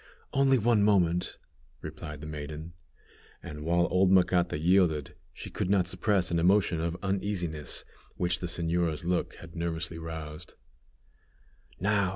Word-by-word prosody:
"Only 135 -1 +4
one 115 -1 +3
moment," 90 -4 +2 0.4
replied 75 -3 -7
the - - -7
maiden; 75 +2 -6 0.7
and 75 0 -7
while 85 +2 +2
old 90 +1 +4
Macata 90 -3 +3
yielded, 80 -3 +2 0.2
she - - -9
could - - -2
not 95 -2 +3
suppress 95 -1 +1
an 85 - +2
emotion 90 -1 +3
of 85 +1 -2
uneasiness 95 -7 -2 0.3
which 85 -2 0
the 90 - -3
señora's 85 -1 0
look 90 0 0
had 85 0 -12
nervously 85 0 -3
roused. 80 -2 -7 1.2
"Now! 100 -1 +2
85 Hz, 135 wpm, -29 LUFS, 80-95 Hz, 1.2 s, Only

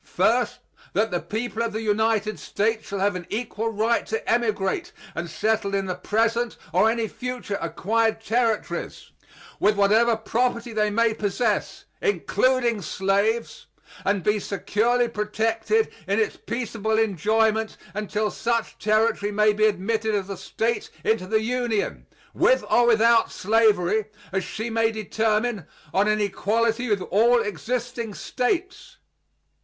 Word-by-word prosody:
First, - - +1 0.4
"that 220 +2 +1
the 175 - 0
people 225 +3 -4
of 230 -2 -1
the 220 +1 -3
United 215 0 +1
States 220 +2 -1
shall 200 - -4
have 200 0 +1
an 180 -2 -6
equal 225 0 -2
right 225 +2 +1
to 220 - -3
emigrate 230 - 0 0.2
and 170 -1 -4
settle 205 +2 0
in 195 0 0
the 185 - -2
present 230 +5 0 0.2
or 220 - +4
any 230 0 0
future 250 -4 -5
acquired 225 +3 0
Territories, 225 -1 -2 0.5
with 210 +1 +3
whatever 220 +4 +4
property 235 +1 -1
they 210 -1 +1
may 230 +1 +2
possess 215 +3 -1 0.2
(including 255 - +1
slaves), 200 +6 -1 0.4
and 200 -3 0
be 210 +3 +2
securely 230 +5 +1
protected 225 - 0
in - - +1
its 440 0 0
peaceable 220 -2 -2
enjoyment 220 +2 +1 0.2
until 210 +1 -2
such 235 -1 -2
Territory 215 -1 +1
may 210 +1 +3
be 215 +1 +3
admitted 215 +2 0
as 200 -1 -2
a - - -3
State 230 +5 -2
into 220 -4 +1
the 220 +2 +2
Union, 240 -2 -1 0.3
with - - +3
or 240 0 +5
without 230 0 +4
slavery, 215 -1 +2 0.3
as 190 0 -1
she 225 +2 -5
may 225 0 +2
determine, 220 -1 -1 0.3
on 200 +2 +3
an 215 0 +2
equality 225 +4 0
with 205 -3 +1
all 235 +5 +5
existing 235 +2 -3
States." 370 +10 -3
220 Hz, 140 wpm, -24 LUFS, 205-230 Hz, 0.5 s, or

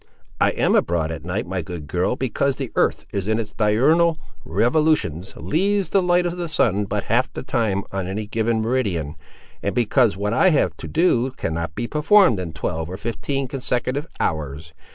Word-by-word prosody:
"I - - +4
am - - +1
abroad 85 -2 +1
at 80 -1 -6
night, 90 +4 -2
my 90 +1 -3
good 80 -1 -7
girl, 90 +9 0
because 130 +2 0
the 135 -5 -5
earth - - +1
in 105 +2 -1
its 105 -2 -5
diurnal 145 +11 +3 0.3
revolutions 120 - +1
leaves 195 +3 0
the 195 - +3
light 175 0 +2
of 175 0 -2
the 175 -1 -3
sun 105 - +1
but 100 +1 -2
half 120 +4 +1
the - - -6
time 110 -6 0
on 95 -2 -3
any 105 +3 -3
given 110 +1 0
meridian, 100 - -1 0.5
and 100 - -2
because 120 -3 +3
what 105 +2 -1
I 185 +10 +5
have 155 - +2
to - - -7
do 155 -7 +2
cannot 80 0 -3
be - - -2
performed 155 - +4
in 90 -3 -4
twelve 80 0 -3
or 95 - -5
fifteen 135 +5 -3
consecutive 130 +2 -2
hours. 80 +1 -3
110 Hz, 180 wpm, -22 LUFS, 90-140 Hz, 0.5 s, I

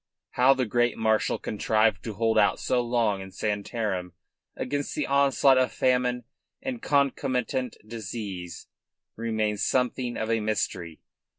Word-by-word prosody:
How 130 +2 +5
the 130 -1 0
great 120 +1 +1
marshal 110 -1 +1
contrived 110 -1 +1
to 110 -3 -5
hold 115 +1 +1
out 110 - +3
so 125 - +1
long 115 -5 0
in 95 - -8
Santarem 100 -2 -3 0.4
against 145 0 -3
the 150 - 0
onslaught 140 -1 +4
of 130 - +1
famine 125 -1 +1 0.4
and 260 -3 -5
concomitant 130 -3 0
disease 105 -5 -6 0.5
remains 110 -2 -1
something 125 -1 0
of 110 +1 -2
a 115 - +2
mystery. 95 -6 -2
115 Hz, 130 wpm, -27 LUFS, 105-130 Hz, 0.5 s, How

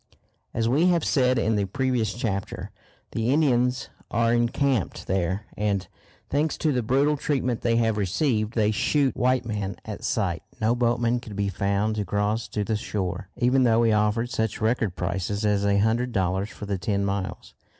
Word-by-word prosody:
As 115 -1 0
we 145 +9 +3
have 170 -3 +2
said 130 -2 +3
in 110 -1 +1
the 100 - +1
previous 120 0 -1
chapter, 100 -5 -3 0.4
the 115 +1 -1
Indians 125 -3 +2 0.2
are 115 0 +2
encamped 120 - 0
there, 95 +2 -1
and, 100 -3 -1 0.4
thanks 150 +2 0
to 155 - +1
the 125 -3 +1
brutal 135 +6 +2
treatment 130 -5 -1
they 115 -1 +2
have 115 -2 +2
received, 110 - 0
they 110 -2 +3
shoot 135 +5 +1
white 130 0 +1
men 105 -4 -3
at - - -7
sight. - - -1 0.2
No 110 +2 +2
boatman 120 0 +1
could 110 -4 -9
be 100 0 0
found 100 +3 0
to 105 - 0
cross 105 +2 -1
to 105 +1 -2
the 110 +2 -1
shore, 95 -3 -3
even 125 +2 +3
though 115 -2 +4
we 115 -1 +3
offered 105 +3 +1
such 110 -2 -1
record 110 -4 0
prices 95 +4 -2
as 105 -1 +2
a 100 0 +3
hundred 115 +4 +1
dollars 95 0 0
for 105 - -8
the 100 -2 -2
ten 100 +2 0
miles. 100 -1 -4
110 Hz, 180 wpm, -25 LUFS, 100-125 Hz, 0.4 s, though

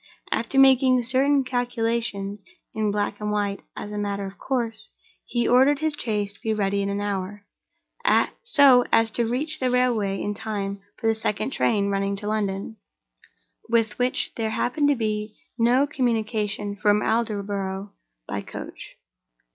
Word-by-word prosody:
After 235 +4 -1
making 260 -2 +6
certain 270 +3 +3
calculations 230 -5 -2 0.3
(in 215 -1 0
black 205 0 -1
and 210 0 -3
white, 205 -1 -1 0.2
as 210 - -6
a 210 - -3
matter 200 -1 -2
of 195 +1 -9
course), 235 -4 -3 0.4
he 240 -1 0
ordered 265 +4 +5
his 315 +1 -1
chaise 210 -7 -2
to - - -21
be 220 -1 0
ready 200 -1 0
in 200 - -1
an 200 0 -2
hour—so 245 - +1
as 225 0 +4
to 230 0 0
reach 285 +6 -2
the 255 - +1
railway 235 -6 +1
in 205 - -2
time 205 -2 -4 0.2
for - - -8
the 225 - +4
second 220 +3 -2
train 200 -6 +1
running 195 0 0
to 205 +1 -6
London—with 215 +2 -4
which 250 +1 0
there 225 -1 -1
happened 255 +6 +1
to 290 - +3
be 215 -2 -2 0.2
no 245 +4 +4
communication 215 -6 -1
from 210 0 +2
Aldborough 200 -3 -2 0.4
by - - -3
coach. - - -9
220 Hz, 145 wpm, -24 LUFS, 205-245 Hz, 0.4 s, making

